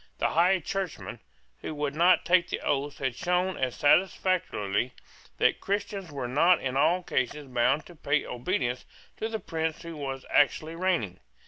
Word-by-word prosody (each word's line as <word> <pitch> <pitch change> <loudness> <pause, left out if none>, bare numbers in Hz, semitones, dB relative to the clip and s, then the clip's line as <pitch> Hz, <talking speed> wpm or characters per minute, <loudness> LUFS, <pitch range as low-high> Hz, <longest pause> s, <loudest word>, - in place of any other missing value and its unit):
The - - +1
High 180 +4 +3
Churchman 190 +1 -4 0.4
who 155 - -6
would 145 -1 -2
not 175 +4 +4
take 180 -1 +3
the - - -2
oaths 145 0 -1
had 130 -2 -1
shown 180 +3 0
as 130 -2 -2
satisfactorily 145 - +1 0.4
that - - +2
Christians 200 -3 -3
were 135 -4 -4
not 165 +7 +4
in 130 -1 -3
all 175 +6 +3
cases 145 0 -2
bound 130 +3 +1
to 175 - -13
pay 145 -1 0
obedience 125 -1 -2 0.3
to 220 - -3
the 220 -1 -3
prince 160 -3 -3
who 170 -1 -7
was 135 -3 -5
actually 155 +2 +2
reigning. 165 - -1
155 Hz, 160 wpm, -28 LUFS, 135-180 Hz, 0.4 s, not